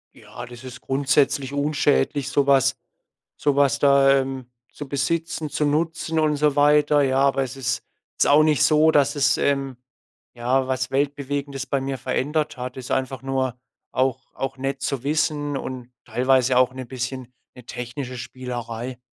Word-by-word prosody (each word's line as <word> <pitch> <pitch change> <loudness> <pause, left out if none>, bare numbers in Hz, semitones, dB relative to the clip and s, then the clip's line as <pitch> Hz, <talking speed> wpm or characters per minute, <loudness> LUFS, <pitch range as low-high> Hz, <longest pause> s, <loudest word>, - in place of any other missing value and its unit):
Ja, - - -10
das 120 0 -12
ist 130 0 -9
grundsätzlich 135 0 +1
unschädlich, 145 -1 +1
so 140 0 +2
was 135 -1 +4 0.6
so 145 -1 0
was 140 0 +3
da, 140 -1 +5
ähm, 130 -1 -5 0.3
zu 145 - -8
besitzen, 155 +3 -2
zu 150 - 0
nutzen 160 +2 -1
und 155 -1 +2
so 150 0 +1
weiter, 150 0 +4
ja. 135 -1 +1
Aber 135 0 +3
es 130 0 -5
ist 125 -3 -2 0.3
jetzt - - +1
auch 145 +2 +6
nicht 155 -2 +3
so, 155 +1 +5
dass 145 -2 +2
es, 140 - +3
ähm, 135 -2 0 0.6
ja, 130 +2 0
was 130 -1 -1
Weltbewegendes 140 0 -2
bei 140 - -1
mir 135 0 -3
verändert 145 +5 -1
hat, 125 0 -6
ist 130 - -8
einfach 130 -1 -2
nur 130 -2 -2 0.3
auch 130 -1 -1
auch 135 0 -4
nett 135 +1 -3
zu 135 -3 -2
wissen 145 -1 0
und 125 -2 -7 0.2
teilweise 125 +2 +2
auch 130 0 +3
'ne 130 -1 -7
bisschen 130 0 -5 0.2
'ne 125 - -13
technische 125 +2 -6
Spielerei. 120 -1 -6
135 Hz, 165 wpm, -23 LUFS, 130-145 Hz, 0.6 s, auch